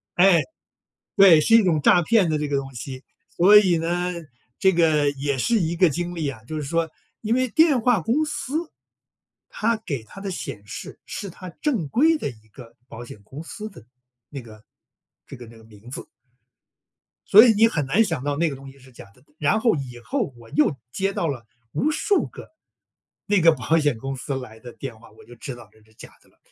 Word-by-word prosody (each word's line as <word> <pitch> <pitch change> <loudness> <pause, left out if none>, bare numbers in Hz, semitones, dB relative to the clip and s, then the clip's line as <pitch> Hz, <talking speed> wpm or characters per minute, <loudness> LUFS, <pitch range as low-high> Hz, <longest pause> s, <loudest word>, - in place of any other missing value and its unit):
哎， 180 -2 +5 0.8
对， 185 -6 +8
是 225 +9 +3
一 225 -3 +6
种 160 -4 +2
诈 175 +4 +4
骗 205 -2 +3
的 155 - 0
这 150 -1 -3
个 140 - 0
东 135 -1 -7
西。 130 +2 -7 0.3
所 200 +4 +5
以 185 -5 +3
呢， 175 +2 -1 0.5
这 190 -1 +4
个 155 -4 +3
也 140 -1 -3
是 230 - +2
一 170 -3 -1
个 180 0 +4
经 175 +3 -4
历 160 -4 -2
啊， 115 -5 -8
就 155 +6 -6
是 150 - -3
说 165 +2 -1 0.3
因 225 +1 0
为 255 0 +1
电 310 -2 +3
话 245 -2 +3
公 250 - 0
司 305 +3 -4 0.8
它 230 +2 0
给 135 -9 -4
它 195 - -13
的 195 -1 -5
显 120 - -7
示 - - -9
是 200 - -6
它 185 +2 -10
正 190 - -2
规 315 - +3
的 - - -3
一 110 -4 -13
个 115 +1 -15
保 115 +1 -9
险 105 - -12
公 135 +9 -10
司 215 +5 -8
的 115 - -15 0.4
那 140 -3 -8
个 110 -2 -15 0.6
这 - - -11
个 120 -1 -11
那 115 0 -15
名 110 +2 -15
字。 - - -7 1.2
所 215 +5 +9
以 230 - +5
你 225 +2 +5
很 150 -10 -2
难 180 +12 +3
想 160 - -3
到 145 0 -1
那 165 -1 +1
个 135 - -6
东 135 0 -12
西 140 - -20
是 130 0 -18
假 120 - -14
的， 125 - -25
然 155 +9 +1
后 230 -4 +2
以 125 -4 -7
后 205 - -3
我 115 -1 -16
又 150 -1 +2 0.2
接 195 +5 -2
到 170 - -1
了 125 -5 -5 0.3
无 305 - 0
数 400 +6 0
个 - - -12 0.8
那 205 -2 +2
个 165 0 +7
保 155 +4 0
险 145 -6 0
公 135 +4 -5
司 135 +1 -5
来 110 -4 -10
的 120 +1 -11
电 120 -5 -8
话， 115 - -17
我 - - -18
就 120 - -15
知 125 +2 -7
道 120 - -14
这 110 - -24
是 110 0 -26
假 - - -13
的 - - -27
了， - - -33
155 Hz, 235 characters per minute, -23 LUFS, 130-195 Hz, 1.2 s, 所